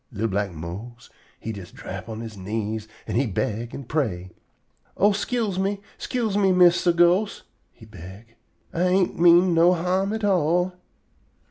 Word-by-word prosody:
Li'l 110 0 -2
black 100 -1 -1
Mose 95 +9 -9 0.3
he 110 - -5
jest 100 -4 -10
drap 110 - -8
on 110 0 -6
he 110 - -11
knees 110 +2 -4 0.2
an' - - -2
he 130 +1 +2
beg 110 +3 -3
an' 140 - -7
pray: 110 - -2 0.7
"Oh, 205 +2 +4
'scuse 205 -1 -1
me! 195 +1 -1 0.2
'Scuse 230 -5 -2
me, 195 -2 +3
Mistah 180 -1 +5
Ghost!" 175 +5 +2 0.3
he - - -16
beg. 95 +7 -12 0.4
"Ah - - -3
ain't 180 0 +1
mean 175 +1 +6
no 170 +2 +5
harm 185 +3 0
at 220 0 -4
all." 180 -1 +2
165 Hz, 155 wpm, -24 LUFS, -, 0.7 s, mean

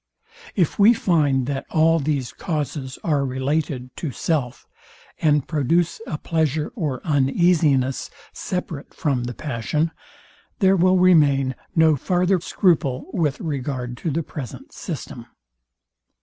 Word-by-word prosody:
If 175 -2 +1
we 220 +4 +7
find 145 - +2
that 135 0 -3
all 165 +1 +3
these 140 -4 -2
causes 145 -5 -4
are 145 -4 +1
related 130 -1 -2
to 160 - -3
self, 130 -1 -2 0.6
and 150 -3 +2
produce 165 - +1
a 150 - -3
pleasure 155 -2 -1
or 150 - -3
uneasiness 145 -2 +2 0.2
separate 170 -5 -5
from 130 -5 -1
the 120 -1 -5
passion, 150 +4 -2 0.7
there 195 -2 +4
will 185 +1 +4
remain 145 -7 +4 0.2
no 160 -2 +5
farther 180 +5 +1
scruple 160 -5 0
with 155 -7 0
regard 130 -5 -3
to 165 - -3
the 160 +3 -1
present 140 -6 -8
system. - - -7
150 Hz, 120 wpm, -22 LUFS, 135-165 Hz, 0.7 s, we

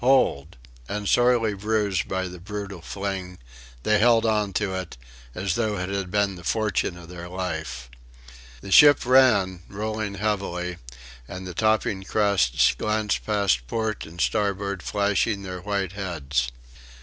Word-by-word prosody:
Hold!" 90 - +2 0.3
And 105 0 -3
sorely 120 -2 +3
bruised 100 -2 0
by 95 0 -2
the 90 0 -9
brutal 100 -1 -6
fling, 95 0 -5 0.5
they 105 -1 +3
held 115 0 +4
on 105 -2 +1
to 100 -1 -1
it, 95 -6 -5 0.4
as 95 -1 -1
though 110 -1 0
it 90 +1 -3
had 100 -2 -3
been 100 0 +1
the 90 - -11
fortune 105 -2 0
of 85 -1 -12
their 90 0 -8
life. 80 -9 -4 0.7
The 100 - -8
ship 145 +4 +7
ran, 110 -9 +4
rolling 110 0 -3
heavily, 95 -4 -2 0.5
and 95 +1 -7
the 90 - -6
topping 110 -3 +1
crests 100 - +2
glanced 110 -1 -1
past 100 - +1
port 110 - -2
and 85 +2 -12
starboard 100 0 0
flashing 100 +1 0
their 90 -1 -6
white 100 -2 -2
heads. 75 -10 -2
100 Hz, 145 wpm, -25 LUFS, 90-105 Hz, 0.7 s, ship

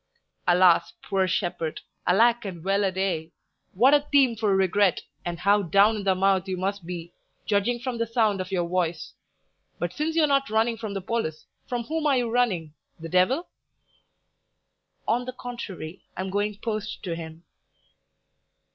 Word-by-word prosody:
"Alas, 175 -1 +5
poor 190 -1 +1
shepherd! 170 -3 -2 0.3
Alack 230 +6 +4
and 180 -5 -7
well 195 +2 +1
a 195 - +1
day! 185 -4 -2 0.4
What 255 +9 +5
a 295 - +7
theme 275 -4 +3
for 210 -3 +1
regret, 190 0 +2 0.2
and 175 -1 -4
how 200 +4 +3
down 200 +5 +4
in 205 - -4
the 190 -1 +3
mouth 190 0 +2
you 185 -1 -2
must 195 -1 -3
be, 175 -1 -6 0.3
judging 215 +4 +1
from 245 -1 -4
the 230 - 0
sound 220 -4 +1
of 185 +1 -7
your 175 -3 0
voice! 175 -2 -2 0.6
But - - -3
since 315 +2 -2
you're 325 -2 +5
not 275 -1 +2
running 225 +2 +2
from 215 -2 -5
the 195 - -2
police, 185 -7 -3 0.2
from 245 -1 -2
whom 310 +4 -1
are 275 -3 +3
you 240 -2 0
running? 190 -11 0 0.3
the 165 0 -7
devil?" 185 - +2 1.6
"On 245 +2 +1
the 255 - -5
contrary, 215 -10 -7 0.2
I - - -2
am 190 0 -4
going 205 +1 -1
post 215 -1 -4
to 175 -4 -3
him." 165 0 -9
200 Hz, 170 wpm, -26 LUFS, 180-235 Hz, 1.6 s, a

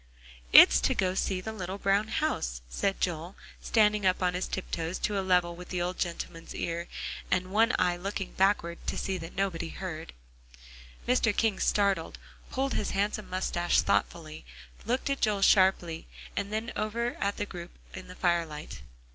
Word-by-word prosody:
"It's 60 +1 +9
to - - +1
go 185 - +2
and 185 - -4
see 185 -2 -1
the 220 +4 -5
little 190 -2 -5
brown 200 +1 +2
house," 60 - -1
said 195 - -1
Joel, 175 +1 -2 0.3
standing 210 -2 +3
up 185 0 +2
on 180 -1 +2
his 180 +1 -2
tiptoes 170 -2 -3
to 205 -1 -1
a - - +1
level 180 -2 +2
with 180 +1 -10
the 180 - -2
old 180 +1 -2
gentleman's 170 -1 -4
ear, 170 +1 -3 0.4
and 185 0 0
one 225 +4 +4
eye 180 -1 +2
looking 195 +1 -4
backward 190 -3 +1
to - - -2
see 190 -1 -2
that 165 0 -9
nobody 185 - -1
heard. 70 -4 -6 0.9
Mr. 240 -4 +2
King 220 -4 +2
started, 200 -1 +1 0.3
pulled 270 +1 -1
his 205 - -1
handsome 210 +1 -1
moustache 175 -1 +1
thoughtfully, 155 -2 -1 0.4
looked 255 +3 0
at 275 - -2
Joel 205 -3 +2
sharply, 185 -5 +3 0.3
and 200 - -2
then 220 +2 -2
over 235 +3 -1
at 200 0 -1
the 205 - -1
group 175 -3 -8 0.2
in 185 - -8
the 180 - -10
firelight. 165 - -1
185 Hz, 170 wpm, -29 LUFS, 175-205 Hz, 0.9 s, It's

